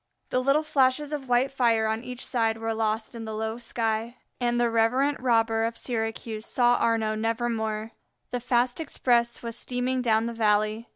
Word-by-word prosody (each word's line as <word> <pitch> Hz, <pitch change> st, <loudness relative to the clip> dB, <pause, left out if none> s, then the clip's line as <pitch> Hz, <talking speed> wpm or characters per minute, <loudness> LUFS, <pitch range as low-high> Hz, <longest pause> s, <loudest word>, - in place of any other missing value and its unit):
The 255 Hz, -, +2 dB
little 275 Hz, +4 st, +2 dB
flashes 285 Hz, 0 st, +1 dB
of 270 Hz, -4 st, -5 dB
white 245 Hz, +3 st, +3 dB
fire 235 Hz, -4 st, +2 dB
on 220 Hz, +1 st, -1 dB
each 250 Hz, 0 st, -6 dB
side 225 Hz, -3 st, 0 dB
were 225 Hz, 0 st, -2 dB
lost 220 Hz, +1 st, -1 dB
in 230 Hz, -1 st, -7 dB
the 220 Hz, -1 st, -5 dB
low 220 Hz, +2 st, -3 dB
sky, 230 Hz, 0 st, -2 dB, 0.2 s
and 240 Hz, -1 st, +1 dB
the 240 Hz, -, +3 dB
reverent 255 Hz, +6 st, +2 dB
robber 225 Hz, -3 st, +2 dB
of 230 Hz, 0 st, -2 dB
Syracuse 225 Hz, -2 st, -3 dB
saw 245 Hz, -1 st, +3 dB
Arnaux 225 Hz, -2 st, +1 dB
nevermore. 225 Hz, -1 st, -2 dB, 0.4 s
The 245 Hz, -, -1 dB
fast 245 Hz, +1 st, +1 dB
express 240 Hz, -6 st, 0 dB
was 230 Hz, -1 st, -4 dB
steaming 250 Hz, +1 st, -2 dB
down 225 Hz, -2 st, +2 dB
the 235 Hz, -, -3 dB
valley. 215 Hz, 0 st, +1 dB
235 Hz, 175 wpm, -26 LUFS, 225-250 Hz, 0.4 s, white